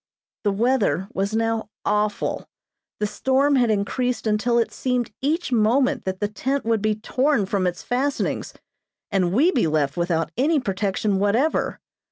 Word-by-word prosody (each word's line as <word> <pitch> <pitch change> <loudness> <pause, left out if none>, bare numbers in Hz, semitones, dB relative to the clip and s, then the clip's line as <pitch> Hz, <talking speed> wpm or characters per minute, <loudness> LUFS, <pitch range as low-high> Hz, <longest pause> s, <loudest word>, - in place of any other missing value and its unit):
The 205 - +2
weather 215 -3 +1
was 200 +3 -1
now 225 -1 0 0.2
awful. 210 0 -1 0.5
The 210 - +1
storm 265 +6 +2
had 245 -2 +3
increased 235 +5 -1
until 220 +3 +1
it 230 - +1
seemed 250 -4 -1
each 305 +3 -1
moment 250 +3 +2
that 190 0 -3
the 205 - 0
tent 260 +7 -2
would 225 -2 +1
be 215 0 +1
torn 250 +2 +1
from 190 -1 0
its 180 0 -4
fastenings, 265 +3 -1 0.6
and 185 -3 +1
we 285 - +4
be 240 - +1
left 150 -2 0
without 165 -2 0
any 295 +4 +3
protection 195 -2 -1
whatever. 225 +10 +1
220 Hz, 155 wpm, -23 LUFS, 200-255 Hz, 0.6 s, we